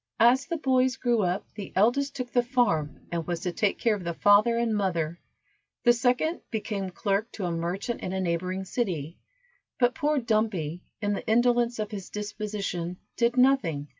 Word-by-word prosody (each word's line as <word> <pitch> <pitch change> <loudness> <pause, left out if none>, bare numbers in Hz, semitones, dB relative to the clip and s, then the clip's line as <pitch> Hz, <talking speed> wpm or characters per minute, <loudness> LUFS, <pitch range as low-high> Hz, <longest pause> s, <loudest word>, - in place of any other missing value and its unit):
As 250 +3 +5
the 335 - -2
boys 260 -3 +2
grew 240 -3 +1
up, 180 0 -1
the 205 -3 -7
eldest 245 +8 +2
took 250 -2 -5
the 245 - +3
farm, 235 - 0
and 170 -1 -3
was 175 -1 -2
to 180 - -2
take 200 +3 0
care 230 - +2
of 200 -3 -4
the 170 -1 -3
father 210 +5 +5
and 235 -2 +1
mother, 170 -5 -1 0.6
the 240 - +6
second 250 +8 +1
became 210 -4 -3
clerk 200 +4 -1
to 195 - -4
a 175 - -1
merchant 175 +8 -3
in 185 - -3
a 190 - -2
neighboring 185 +1 -1
city, 175 - -3 0.6
but 245 -1 +3
poor 300 0 0
Dumpy, 215 - 0 0.2
in 205 0 +1
the 200 - -5
indolence 240 +1 +3
of 215 0 -3
his 195 -4 -6
disposition, 205 -4 -4 0.2
did 240 +1 +1
nothing. 200 - +3
210 Hz, 180 wpm, -27 LUFS, 180-240 Hz, 0.6 s, the